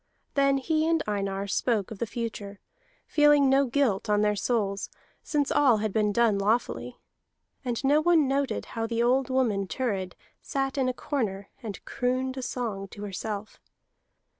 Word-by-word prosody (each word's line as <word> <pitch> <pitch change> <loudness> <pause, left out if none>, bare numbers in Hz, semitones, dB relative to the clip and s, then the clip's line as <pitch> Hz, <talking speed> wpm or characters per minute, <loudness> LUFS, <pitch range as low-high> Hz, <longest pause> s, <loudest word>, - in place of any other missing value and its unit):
Then 275 -1 +3
he 310 +3 0
and 330 -1 +2
Einar 195 -1 -2
spoke 205 +1 0
of 215 - -7
the 235 - -1
future, 210 -3 -5 0.5
feeling 295 -2 +4
no 275 0 +4
guilt 235 -6 +1
on 210 0 +3
their 210 0 +2
souls, 200 -3 -1 0.3
since 290 -2 0
all 260 -6 +4
had 215 -1 -2
been 210 -1 +2
done 220 -2 +3
lawfully. 220 +4 -1 0.7
And 245 -1 -2
no 290 +3 +4
one 325 -3 +4
noted 275 0 -1
how 225 -1 -2
the 230 0 0
old 255 +2 +2
woman 225 -7 +1
Thurid 195 -6 -2 0.3
sat 270 -1 -2
in 265 -2 +1
a - - +2
corner 205 -8 -3
and 210 -5 -7
crooned 255 +1 -1
a 260 - -4
song 225 -6 -3
to 205 +2 -10
herself. 205 +1 -5
235 Hz, 165 wpm, -27 LUFS, 205-270 Hz, 0.7 s, feeling